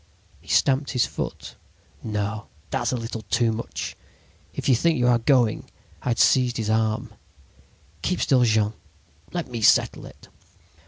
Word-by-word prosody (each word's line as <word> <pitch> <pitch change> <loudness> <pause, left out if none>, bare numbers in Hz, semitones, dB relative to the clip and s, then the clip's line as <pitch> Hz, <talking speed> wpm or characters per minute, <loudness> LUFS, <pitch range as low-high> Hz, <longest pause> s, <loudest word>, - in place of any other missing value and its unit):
"He - - -22
stamped 135 +1 +2
his 125 - +3
foot. - - -6 0.4
"'No, 105 -1 -3 0.2
that's - - 0
a 130 - -1
little 115 -1 -5
too 115 -2 +2
much! 110 +1 -5 0.6
If - - -5
you 135 - +5
think 165 +6 +2
you 125 - +1
are 120 -1 +4
going—' 120 -3 +2 0.3
"I - - -8
had 120 - +1
seized 125 -2 +3
his 110 -2 -1
arm. 110 -1 0 0.9
"'Keep 180 - -1
still, 130 -3 +3
Jean... 110 -2 +2 0.6
Let 175 -2 -3
me 115 -2 -4
settle - - +3
it.' - - -16
115 Hz, 155 wpm, -24 LUFS, 110-130 Hz, 0.9 s, you